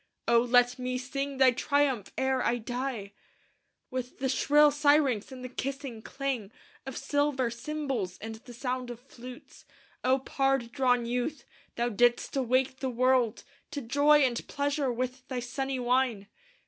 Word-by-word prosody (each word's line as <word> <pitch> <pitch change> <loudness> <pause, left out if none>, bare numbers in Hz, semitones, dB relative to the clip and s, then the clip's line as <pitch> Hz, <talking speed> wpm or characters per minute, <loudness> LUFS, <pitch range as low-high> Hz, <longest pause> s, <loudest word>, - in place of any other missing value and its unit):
O 235 0 +6
let 245 +1 +3
me 250 0 -2
sing 275 +2 -4
thy 260 -1 +6
triumph 270 -3 0
ere 265 -1 +1
I 240 - +1
die! 240 -3 -4 0.8
"With 255 -1 -4
the 265 0 -1
shrill 295 +3 +5
syrinx 285 -6 +3
and 255 -1 -8
the - - -3
kissing 265 -2 -5
clang 265 -6 -3 0.4
Of 265 - -5
silver 270 -3 0
cymbals, 250 -8 -3
and 225 +3 -7
the 240 +2 -12
sound 250 0 -3
of 240 -1 -7
flutes, 250 -1 -12 0.4
O 260 +1 +4
pard 270 -2 0
drawn 250 -2 +2
youth, 245 +3 -2 0.3
thou 240 +1 0
dist 240 +4 +2
awake 260 0 +1
the 265 - -1
world 250 -2 +2 0.3
To 290 -1 -4
joy 285 +5 +4
and 245 -3 0
pleasure 285 -1 0
with 255 +2 -4
thy 255 -2 -3
sunny 265 +2 -3
wine! 245 -4 +1
255 Hz, 150 wpm, -29 LUFS, 240-275 Hz, 0.8 s, O